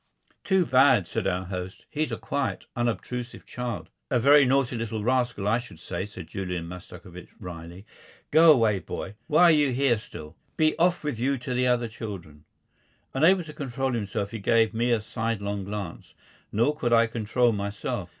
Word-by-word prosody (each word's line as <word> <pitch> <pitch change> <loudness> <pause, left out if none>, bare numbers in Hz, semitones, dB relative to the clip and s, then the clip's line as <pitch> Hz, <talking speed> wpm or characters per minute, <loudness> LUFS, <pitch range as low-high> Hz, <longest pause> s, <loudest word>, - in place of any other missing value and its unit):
"Too 190 -2 +3
bad," 130 - +5
said 100 +3 -2
our 90 0 -1
host. 90 0 -6
"He's 155 +1 -2
a - - -2
quiet, 140 -2 -3
unobtrusive 120 +1 -3
child." 125 -3 -5 0.2
"A 125 - +2
very 140 +3 +6
naughty 130 -1 +2
little 115 -2 -3
rascal, 120 -4 0
I 115 +3 +3
should 105 -9 -12
say," 95 +3 -4
said 95 -4 -9
Julian 90 -2 -4
Mastakovich, 90 0 -11
wryly. 85 +2 -9 0.5
"Go 160 +1 +8
away, 115 -8 +3
boy. 95 - -6
Why 160 +2 +4
are 175 - +8
you 145 -3 +3
here 125 -3 +2
still? 80 -6 -11 0.2
Be 155 0 +3
off 175 0 +2
with 145 -7 -3
you 135 +3 +1
to 125 +1 -5
the 125 0 +1
other 120 -1 +2
children." 95 -10 -8 0.7
Unable 170 +7 +4
to 155 -2 -10
control 135 -1 -2
himself, 100 -3 -3
he 115 - -5
gave 115 +2 +3
me 120 +2 0
a 115 -2 +2
sidelong 105 -3 -3
glance. 100 -4 -7 0.4
Nor 120 +8 +2
could 120 -5 0
I 115 0 +6
control 115 +2 +1
myself. 100 -1 -3
115 Hz, 175 wpm, -26 LUFS, 100-135 Hz, 0.7 s, Go